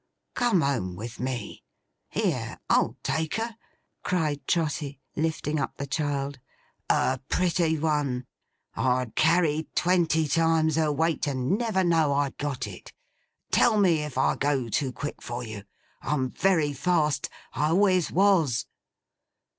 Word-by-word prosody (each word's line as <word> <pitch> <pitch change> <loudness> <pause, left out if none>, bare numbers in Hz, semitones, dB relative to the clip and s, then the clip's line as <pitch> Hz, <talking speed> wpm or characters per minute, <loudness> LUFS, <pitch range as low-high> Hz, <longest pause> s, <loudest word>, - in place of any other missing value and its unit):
Come 240 -8 +2
home 120 - -1
with 115 +5 -7
me! 125 -4 -4 0.5
Here! - - -1
I'll - - +2
take 160 0 -1
her!' 225 0 -3 0.5
cried 150 -6 -1
Trotty, 150 -4 -1 0.2
lifting 155 -1 -1
up - - -3
the 140 - -3
child. 140 -1 -2 0.5
'A 130 0 +2
pretty 170 -3 +1
one! 145 -5 0 0.5
I'd 125 -2 0
carry 160 -1 +3
twenty 170 -3 +2
times 160 +1 +2
her 155 -2 +2
weight, 160 +1 0
and 130 +4 0
never 215 -4 0
know 165 -4 +3
I'd 140 -1 -1
got 145 -3 -2
it. - - -10 0.6
Tell 220 -3 +4
me 175 -6 +4
if 150 -4 -6
I 130 - +3
go 140 -4 0
too 130 +4 0
quick 145 +3 -6
for 120 +1 -5
you. 110 -3 -8 0.4
I'm 130 -4 -1
very 165 -6 +2
fast. 150 -2 +1 0.2
I 150 - +1
always 185 +1 +3
was! 180 - +3
150 Hz, 135 wpm, -27 LUFS, 135-165 Hz, 0.6 s, Tell